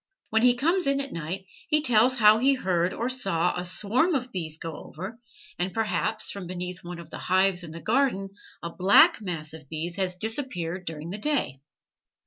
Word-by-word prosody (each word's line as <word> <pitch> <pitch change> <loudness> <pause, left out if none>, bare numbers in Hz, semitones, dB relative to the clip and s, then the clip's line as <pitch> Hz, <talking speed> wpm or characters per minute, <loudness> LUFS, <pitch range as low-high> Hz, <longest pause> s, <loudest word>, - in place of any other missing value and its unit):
When 220 0 +3
he 245 0 +5
comes 335 +6 +1
in 275 0 +2
at 275 0 -5
night 170 +4 -5 0.2
he 305 -1 +3
tells 245 0 +4
how 215 -2 +6
he 270 +3 +4
heard 180 -6 0
or 235 - -2
saw 195 -10 +1
a 180 - -3
swarm 225 - +1
of 255 -1 -2
bees 160 -4 -4
go 165 -1 -6
over; 190 +8 -8 0.4
and, 180 +1 -2
perhaps 220 0 0
from 195 -3 -7
beneath 180 0 -6
one 175 0 -7
of 170 -2 -11
the - - -7
hives 185 0 +2
in 170 - -8
the 165 +1 -9
garden 225 -6 +1 0.3
a 170 - -4
black 190 +3 +5
mass 160 -6 -5
of 155 -4 -12
bees 165 +3 -4
has 185 -2 -1
disappeared 185 - -2
during 160 +1 -6
the 205 - -5
day. 260 - -1
190 Hz, 195 wpm, -26 LUFS, 170-240 Hz, 0.4 s, how